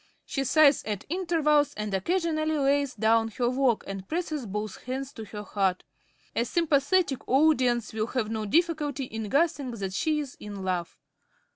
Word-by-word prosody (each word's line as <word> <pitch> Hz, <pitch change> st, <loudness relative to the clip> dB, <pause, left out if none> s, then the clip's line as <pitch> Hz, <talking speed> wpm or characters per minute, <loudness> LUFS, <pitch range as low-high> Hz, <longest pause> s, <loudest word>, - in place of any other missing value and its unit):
She 275 Hz, -, -2 dB
sighs 295 Hz, +1 st, +5 dB
at 210 Hz, -2 st, -4 dB
intervals 315 Hz, -4 st, +2 dB
and 210 Hz, -1 st, -4 dB
occasionally 315 Hz, -, 0 dB
lays 280 Hz, -1 st, +1 dB
down 225 Hz, 0 st, +3 dB
her 245 Hz, -, +1 dB
work 255 Hz, -3 st, +2 dB
and 195 Hz, -1 st, -6 dB
presses 310 Hz, -7 st, -3 dB
both 210 Hz, +1 st, -4 dB
hands 265 Hz, +2 st, -4 dB
to 220 Hz, -, -8 dB
her 210 Hz, 0 st, -7 dB
heart. 195 Hz, -3 st, 0 dB, 0.5 s
A 235 Hz, -, +2 dB
sympathetic 295 Hz, +1 st, +2 dB
audience 255 Hz, -5 st, +3 dB
will 220 Hz, 0 st, -1 dB
have 235 Hz, -4 st, -2 dB
no 215 Hz, -1 st, -2 dB
difficulty 300 Hz, -, +1 dB
in 220 Hz, -4 st, -5 dB
guessing 285 Hz, 0 st, +1 dB
that 200 Hz, -5 st, -4 dB
she 305 Hz, +8 st, +1 dB
is 285 Hz, -3 st, -5 dB
in 205 Hz, -2 st, -7 dB
love. 180 Hz, -2 st, -2 dB
260 Hz, 160 wpm, -27 LUFS, 215-300 Hz, 0.5 s, sighs